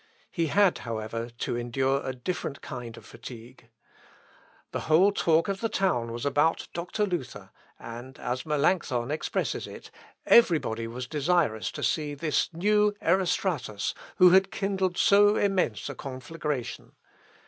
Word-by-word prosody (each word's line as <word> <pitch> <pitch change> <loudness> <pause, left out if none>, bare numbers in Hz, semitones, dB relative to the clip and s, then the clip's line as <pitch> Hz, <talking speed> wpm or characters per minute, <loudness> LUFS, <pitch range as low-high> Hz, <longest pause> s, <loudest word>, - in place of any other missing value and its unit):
He 165 -3 0
had, 195 +3 +3
however, 115 0 -4
to - - -2
endure 130 +3 0
a 130 - -2
different 140 +2 -4
kind 120 -2 -7
of - - -13
fatigue. 120 0 -12 1.0
The - - -2
whole 180 +6 +6
talk 165 -4 +2
of 195 -1 -3
the 225 - 0
town 180 - 0
was 120 +2 -5
about 145 +3 +1
Dr. 175 +5 -1
Luther, 175 -9 -5 0.3
and, 120 +3 -9
as 125 +1 -3
Melancthon 145 -5 0
expresses 155 - -2
it, - - -11 0.3
every 215 -8 +6
body 115 -5 -4
was 125 +2 -6
desirous 150 -5 0
to - - -6
see 150 -2 0
"this 150 +1 0
new 210 +4 +2
Erostratus, 170 - 0 0.2
who 180 -1 +7
had 190 +1 +5
kindled 190 -2 -1
so 205 +1 +5
immense 185 - 0
a - - -4
conflagration." 135 -1 -5
150 Hz, 140 wpm, -27 LUFS, 125-185 Hz, 1.0 s, who